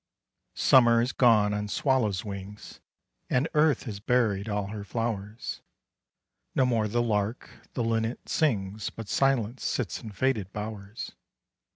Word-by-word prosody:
Summer 120 -3 +6
is 120 +2 +1
gone 110 -6 +4
on 105 0 -2
swallows' 110 -5 +1
wings, 100 0 -8 0.5
And 125 +5 +2
Earth 150 -4 +3
has 105 -4 -6
buried 110 -3 +1
all 105 -1 -2
her 105 -1 -5
flowers: 110 -1 -4 0.9
No 130 - +4
more 115 -4 +1
the 120 +3 +1
lark, 105 +1 -1 0.2
the 120 - -1
linnet 115 +1 -1
sings, 105 -8 0
But 115 -2 -9
Silence 130 -1 +1
sits 120 -8 -2
in 110 - -8
faded 105 -2 0
bowers. 105 0 -6
110 Hz, 135 wpm, -28 LUFS, 105-120 Hz, 0.9 s, Summer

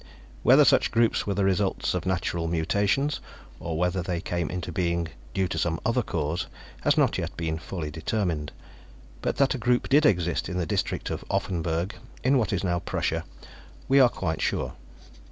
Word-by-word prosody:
Whether - - +7
such - - +4
groups 115 -2 +2
were 100 - 0
the 100 0 +2
results 95 0 +1
of 90 -1 -2
natural 85 -2 -1
mutations, 100 - +1 0.4
or 80 -2 -3
whether 90 +2 +1
they 90 -1 -2
came 85 -2 -2
into 90 -1 -4
being 85 -1 0 0.3
due 95 -1 +2
to 80 - -2
some 80 0 0
other 115 +2 +2
cause, 85 -4 -2 0.3
has - - +2
not - - +3
yet - - -4
been 80 -1 -2
fully 80 -3 -5
determined, 80 -1 -2 0.7
but - - -1
that 140 -1 +3
a 130 - -4
group 120 +2 +1
did 145 +3 +5
exist 90 -4 +1
in 90 - -3
the 90 - 0
district - - -2
of - - -4
Offenburg, 85 +1 -1 0.3
in 130 +1 +4
what 110 - 0
is 95 -1 -1
now 85 -2 +1
Prussia, - - -2 0.6
we 135 +1 +5
are 130 -2 +7
quite 80 -8 -3
sure. - - -1
90 Hz, 180 wpm, -26 LUFS, 85-100 Hz, 0.7 s, Whether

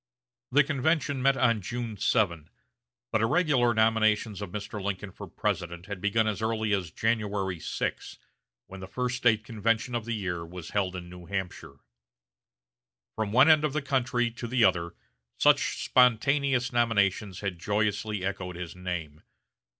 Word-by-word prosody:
The 145 +3 +5
convention 145 0 0
met 135 +1 +3
on 115 -4 +2
June 115 +3 -4
7, 95 -7 0 0.6
but 110 - +1
irregular 130 -1 +3
nominations 110 -2 +2
of 100 - -5
Mr. 105 +1 -6
Lincoln 100 0 -3
for - - -9
President 85 +1 -3
had 100 -2 -6
begun 110 +2 +2
as 110 -1 -2
early 110 -1 0
as 95 -4 -1
January 100 -2 -1
6, - - -4 0.5
when 95 - -10
the 95 - -8
first 125 +4 -2
State 110 -3 +3
convention 115 +2 -1
of 120 -2 -2
the 115 -1 -2
year 90 -5 -3
was 85 0 -9
held 95 -3 0
in 90 -1 -7
New 90 -1 -11
Hampshire. 90 -8 -5 1.3
From 110 -2 -2
one 130 +6 +6
end 155 -2 +6
of 150 -3 0
the 155 - 0
country 125 -3 0
to 120 +1 -6
the 120 0 +2
other 85 -2 +1 0.4
such - - +3
spontaneous 125 +1 +3
nominations 100 -5 +1
had 95 -4 -3
joyously 105 0 -1
echoed 95 -2 -4
his 85 -1 -7
name. 85 -5 -5
105 Hz, 155 wpm, -28 LUFS, 95-120 Hz, 1.3 s, one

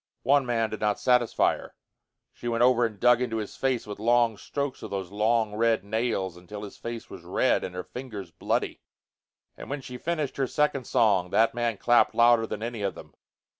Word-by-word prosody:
One 135 +1 +3
man 115 -2 0
did 110 - -5
not 105 -1 0
satisfy 125 -2 +3
her. - - -12 0.6
She 120 - -8
went 115 0 +1
over 120 -1 +4
and 105 -3 -13
dug 125 0 +5
into 115 -3 -1
his 105 -2 -5
face 130 -3 -1
with 105 -1 -7
long 120 0 +3
strokes 140 +6 -4
of - - -7
those 95 -2 -4
long 110 +1 +1
red 115 0 +2
nails 100 -4 -2
until 105 +4 -9
his 100 - -8
face 115 -1 -7
was - - -9
red - - +1
and 90 - -6
her 90 - -4
fingers 110 -9 -8
bloody. - - -2 0.7
And - - -10
when 140 0 -3
she 125 -1 -8
finished 155 -3 -2
her 135 -1 +1
second 140 -2 0
song 95 -5 +3
that 115 +4 +3
man 120 -2 -1
clapped 120 +4 +3
louder 120 -1 +5
than 110 0 -5
any 115 -2 -4
of 100 -1 -2
them. - - -12
115 Hz, 205 wpm, -27 LUFS, 105-125 Hz, 0.7 s, dug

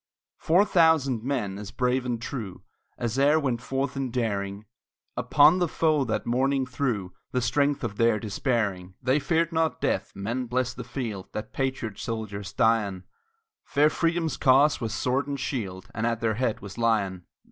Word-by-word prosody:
Four 180 +6 +4
thousand 160 - +3
men, 115 -8 -2
as 105 -1 -7
brave 125 0 0
and 120 -2 -1
true 115 -6 -6 0.3
As 120 +2 -2
e'er 145 +3 +5
went 130 -6 -1
forth 135 +2 -2
in 135 -1 -2
daring, 100 -4 -2 0.5
Upon 155 +5 +5
the 175 - +2
foe 155 -3 +2
that 110 - -2
morning 135 +2 +1
threw 120 -8 -2 0.2
The 125 - +1
strength 145 +2 +1
of 100 - -3
their 115 -2 +3
despairing. 100 -4 -2
They 130 +4 +3
feared 165 +2 +1
not 160 -1 0
death - - -1
men 115 +6 -3
bless 125 +1 0
the 125 - -7
field 115 -6 -5
That 110 0 -6
patriot 130 -6 -2
soldiers 105 -4 -4
die 115 -1 +3
on; 95 -2 -6 0.6
Fair 150 +2 +3
Freedom's 165 -3 0
cause 140 +3 +4
was 115 -2 -2
sword 125 +4 0
and 140 -1 -3
shield, 110 -8 -4
And 110 +2 -1
at 115 -1 -1
their 115 -1 +1
head 115 0 -1
was 100 +3 -9
Lyon. 100 -6 0
125 Hz, 170 wpm, -26 LUFS, 110-140 Hz, 0.6 s, e'er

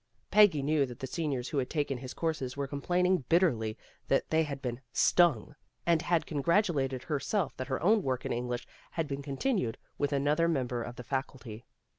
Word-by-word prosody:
Peggy 190 -8 +6
knew 145 -1 +2
that 120 - -9
the 135 - -4
seniors 135 -3 -2
who 145 - 0
had 125 - -2
taken 145 -4 -1
his 130 0 -8
courses 145 -6 -2
were 140 - -1
complaining 175 +5 +1
bitterly 120 -11 +2 0.3
that - - +1
they 160 0 +4
had 145 -3 -3
been 125 -1 -4
" 125 - -48 0.2
stung, 155 -8 +3 0.2
" - - -46
and 170 -2 +3
had 170 -3 +1
congratulated 145 - +1
her 150 0 -1
self 195 0 -1
that 130 - -4
her 130 -2 -1
own 210 +4 +5
work 130 -6 -2
in - - -1
English 120 0 -3 0.3
had 165 -2 -1
been 140 -1 -4
con 140 -1 -6
tinued 190 - 0 0.2
with 145 0 0
another 145 +4 +2
member 125 -7 -1
of 120 +1 -6
the 125 - -8
faculty. 125 -3 -5
140 Hz, 205 wpm, -30 LUFS, 130-165 Hz, 0.3 s, Peggy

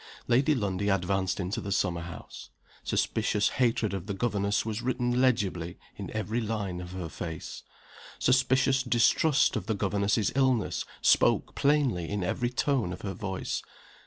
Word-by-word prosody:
Lady 135 +5 +3
Lundie 100 -3 -1
advanced 95 0 0
into 95 +2 -2
the 100 - -5
summer 90 -3 0
house. 85 0 -9 0.3
Suspicious 105 0 +1
hatred 115 -4 +1
of 95 0 -4
the 100 - -3
governess 100 -1 0
was 110 0 -3
written 125 0 0
legibly 95 -9 0 0.2
in - - -7
every 110 +2 -2
line 105 -5 -3
of 90 0 -8
her 90 -2 -4
face. 80 0 -6 0.6
Suspicious 130 +1 +3
distrust 135 +4 +3
of 105 -5 -3
the 110 - 0
governess's 100 +1 +1
illness 130 -4 +1 0.2
spoke - - +3
plainly 135 - +1
in 100 -2 -2
every 120 +7 -1
tone 125 -6 0
of 90 - -7
her 100 -2 -4
voice. 95 -1 -3
105 Hz, 150 wpm, -28 LUFS, 95-125 Hz, 0.6 s, Lady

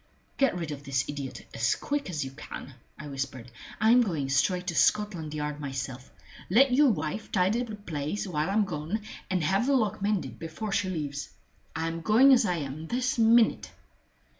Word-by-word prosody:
"Get 275 -8 +3
rid 165 -3 -4
of 145 -1 -7
this 135 -2 0
idiot 140 -2 -6
as 115 0 +1
quick 290 -6 -3
as 150 -6 -2
you 135 - -7
can," 135 0 -9 0.2
I 150 - -8
whispered. 135 -3 -5 0.3
"I'm 225 +4 +6
going 160 - -1
straight 180 +7 +1
to 175 -3 -2
Scotland 175 -8 +1
Yard 150 0 -3
myself. 135 -2 -5 0.4
Let 250 +7 +5
your 285 +2 +6
wife 160 +1 -3
tidy 190 +6 +2
the 230 -3 -5
place 165 -1 -4
while 155 -2 -1
I'm 205 +1 +2
gone, 165 +5 -3 0.3
and 185 -3 0
have 195 - +1
the 280 - +4
lock 215 -4 0
mended 205 -2 -1
before 165 +6 -5
she 195 -1 0
leaves. 145 -5 -4 0.5
I'm 165 +1 -2
going 245 +9 +6
as 240 -4 +4
I 180 - +1
am, 150 0 -5
this 250 +2 -1
minute!" 230 0 +4
175 Hz, 180 wpm, -28 LUFS, 145-215 Hz, 0.5 s, I'm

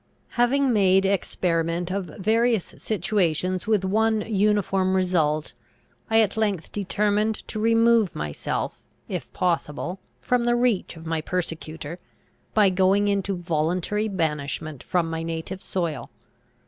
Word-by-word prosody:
Having 255 +2 +2
made 195 -2 +4
experiment 175 -3 0
of 195 -1 -2
various 220 +5 0
situations 185 -2 0
with 210 -4 +2
one 220 +2 +2
uniform 200 -3 +1
result, 160 -5 +1 0.6
I 225 0 +5
at 210 -3 +1
length 205 -6 -1
determined 210 +2 0
to 215 - -3
remove 230 -2 +3
myself, 75 -1 -3 0.3
if - - -5
possible, 175 0 -1 0.2
from 245 -1 +1
the 240 0 +3
reach 240 -8 0
of 160 - -11
my 160 -1 -1
persecutor, 160 -1 -4 0.6
by 205 -3 +5
going 190 +2 +3
into 195 -1 0
voluntary 175 +5 0
banishment 155 - -2
from 175 -2 0
my 165 0 -3
native 165 +3 -5
soil. 170 -5 -3
190 Hz, 120 wpm, -24 LUFS, 165-215 Hz, 0.6 s, I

